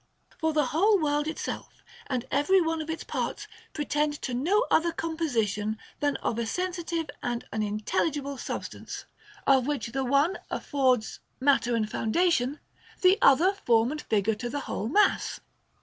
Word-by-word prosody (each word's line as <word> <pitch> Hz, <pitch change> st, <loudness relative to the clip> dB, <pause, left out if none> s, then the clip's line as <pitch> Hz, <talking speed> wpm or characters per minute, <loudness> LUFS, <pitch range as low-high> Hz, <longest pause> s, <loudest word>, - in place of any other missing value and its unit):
For 320 Hz, -1 st, +1 dB
the 300 Hz, -2 st, +2 dB
whole 395 Hz, -, +3 dB
world 295 Hz, -1 st, +1 dB
itself 315 Hz, -, -5 dB, 0.2 s
and 255 Hz, -3 st, -2 dB
every 295 Hz, +8 st, +4 dB
one 325 Hz, -2 st, 0 dB
of 310 Hz, -, -7 dB
its 320 Hz, -, -3 dB
parts -, -, -3 dB, 0.2 s
pretend 295 Hz, 0 st, -1 dB
to 255 Hz, -, -2 dB
no 370 Hz, -, +2 dB
other 335 Hz, +1 st, +4 dB
composition 230 Hz, -11 st, -1 dB, 0.2 s
than 290 Hz, -1 st, +1 dB
of 230 Hz, -, -1 dB
a 230 Hz, -, -1 dB
sensitive 345 Hz, +1 st, -2 dB
and 240 Hz, -1 st, -3 dB
an 220 Hz, -, -1 dB
intelligible 270 Hz, +7 st, -1 dB
substance, -, -, -6 dB, 0.4 s
of 265 Hz, -2 st, +4 dB
which 285 Hz, -5 st, -2 dB
the 270 Hz, +2 st, -1 dB
one 280 Hz, +8 st, +2 dB
affords 255 Hz, -6 st, 0 dB, 0.2 s
mat 275 Hz, +1 st, +4 dB
ter 240 Hz, 0 st, 0 dB
and 220 Hz, -2 st, 0 dB
foundation, 275 Hz, +4 st, +1 dB, 0.4 s
the 370 Hz, +2 st, +6 dB
other 320 Hz, +9 st, +6 dB
form 235 Hz, -, +2 dB
and 305 Hz, 0 st, -4 dB
figure 215 Hz, 0 st, +1 dB
to 240 Hz, +3 st, -5 dB
the 285 Hz, +3 st, -3 dB
whole 215 Hz, -, -3 dB
mass. 415 Hz, +9 st, +2 dB
285 Hz, 160 wpm, -28 LUFS, 240-325 Hz, 0.4 s, the